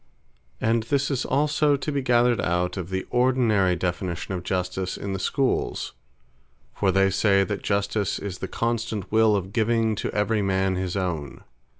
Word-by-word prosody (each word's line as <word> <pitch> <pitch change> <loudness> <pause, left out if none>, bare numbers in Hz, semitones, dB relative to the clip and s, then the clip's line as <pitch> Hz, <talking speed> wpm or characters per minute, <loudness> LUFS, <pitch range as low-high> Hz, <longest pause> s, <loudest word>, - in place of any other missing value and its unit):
And 115 +1 +2
this 140 +5 0
is 130 - -1
also 145 +1 +2
to 145 +2 -3
be 140 -1 -1
gathered 120 -2 +3
out 90 +1 0
of 95 -3 -5
the 95 0 -3
ordinary 120 -7 +3
definition 90 +1 -3
of 90 - -3
Justice 90 +1 -2
in 100 -1 -4
the 95 - -3
Schooles: 135 +7 -1 0.8
For 95 -2 +1
they 95 +1 +3
say, 100 +1 +3
that 105 0 -3
"Justice 100 0 0
is 95 -3 -6
the 95 - -4
constant 115 -1 -2
Will 110 -1 +4
of 95 0 -3
giving 115 0 +2
to - - -2
every 105 +1 +1
man 95 -1 +1
his 95 +1 -2
own." 85 -7 -3
100 Hz, 170 wpm, -25 LUFS, 95-115 Hz, 0.8 s, Will